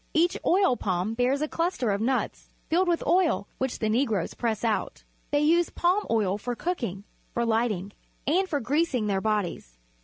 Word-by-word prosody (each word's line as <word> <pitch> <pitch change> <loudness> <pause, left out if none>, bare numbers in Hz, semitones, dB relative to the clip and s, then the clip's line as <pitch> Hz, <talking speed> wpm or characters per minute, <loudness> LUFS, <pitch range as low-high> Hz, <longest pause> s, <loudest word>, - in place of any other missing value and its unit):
Each 340 +2 +3
oil 380 -7 +4
palm 185 +2 -1
bears 255 +5 +1
a - - 0
cluster 330 - -1
of 200 +1 -1
nuts, 255 +3 -1 0.2
filled 360 +3 +3
with 345 -1 +1
oil, 345 - +2
which 260 -1 -1
the 220 - -1
Negroes 220 -5 0
press 225 -3 -2
out. 225 -2 -1 0.3
They 290 0 +2
use 335 +3 +3
palm 370 +4 +1
oil 205 -3 +1
for 245 +3 -3
cooking, 235 - -3 0.3
for 235 - +1
light 230 +1 +2
ing, 200 -1 -4 0.3
and 370 +6 +2
for 290 - 0
greasing 275 -2 0
their 195 -2 0
bodies. 195 - -2
245 Hz, 180 wpm, -27 LUFS, 210-330 Hz, 0.3 s, oil